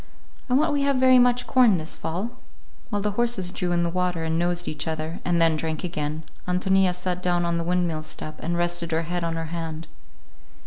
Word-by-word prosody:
I 250 - +3
want 305 +2 +3
we 285 - +1
have 280 0 +2
very 255 0 +6
much 245 0 +3
corn 245 -8 +5
this 160 0 -5
fall." 185 +9 -3 0.6
While 205 -1 -1
the 210 - +1
horses 210 -4 0
drew 180 -1 -2
in 175 0 +2
the 170 - +1
water, 180 -2 0
and 160 0 0
nosed 175 0 0
each 150 +2 -3
other, 160 +1 -3
and 175 -1 +1
then 165 -1 +4
drank 155 0 -3
again, 155 -2 -3 0.2
Ántonia 185 0 +2
sat 180 0 -3
down 175 -1 +1
on 170 0 0
the - - -1
windmill 175 -2 0
step 155 0 -7
and 170 +1 -1
rested 175 -1 -1
her 165 +1 +1
head 175 +1 -3
on 165 -1 -1
her 165 0 -4
hand. 165 -1 -4
175 Hz, 215 wpm, -25 LUFS, 165-190 Hz, 0.6 s, very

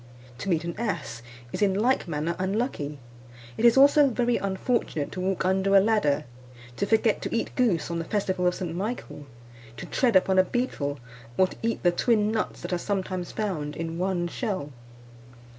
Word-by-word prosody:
To 200 - -4
meet 170 -2 +1
an 170 0 -3
ass, 205 - -3 0.3
is - - -3
in 195 -2 +3
like 235 +1 +1
manner 165 +1 -2
unlucky. 190 - -2 0.6
It - - -4
is 235 +2 +6
also 285 +1 +7
very 245 -1 +1
unfortunate 190 - -1
to 185 - -5
walk 190 0 -1
under 190 +1 +2
a - - +9
ladder; 190 -9 +2 0.5
to 200 - 0
forget 220 0 +2
to - - -3
eat 230 - -2
goose 210 -10 +1
on 170 - -2
the 165 - -4
festival 185 -3 0
of 180 - +1
St. 175 -3 -4
Michael; 190 - -5 0.5
to - - -6
tread 245 -6 +1
upon 190 0 +4
a - - +7
beetle, 180 - -2 0.4
or 185 - +6
to - - -11
eat 230 0 -2
the 175 - +5
twin 215 +3 +2
nuts 220 -1 -2
that - - -4
are 175 - 0
sometimes 185 -2 -3
found 160 -9 -3
in 165 +1 -4
one 180 -2 0
shell. 185 - -4
190 Hz, 185 wpm, -26 LUFS, 170-220 Hz, 0.6 s, a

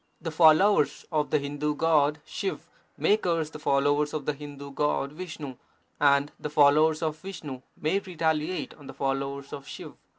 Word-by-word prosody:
The 165 - -4
followers 160 +2 +4
of 155 -2 0
the 155 - +3
Hindu 145 +1 -2
god 150 -2 +2
Shiv 385 - -4 0.3
may 210 - +3
curse 165 -6 -1
the 155 - -9
followers 145 +1 +1
of 150 -3 -4
the 150 - 0
Hindu 140 -1 -9
god 140 0 0
Vishnu, 155 -5 -7 0.4
and 140 0 +4
the 150 - -4
followers 150 +2 +4
of 155 -1 -1
Vishnu 155 -8 -7 0.2
may 160 +6 +1
retaliate 165 -2 -2
on 145 - -13
the 135 - -9
followers 140 0 -3
of 140 0 -8
Shiv. - - -8
150 Hz, 165 wpm, -27 LUFS, 140-160 Hz, 0.4 s, followers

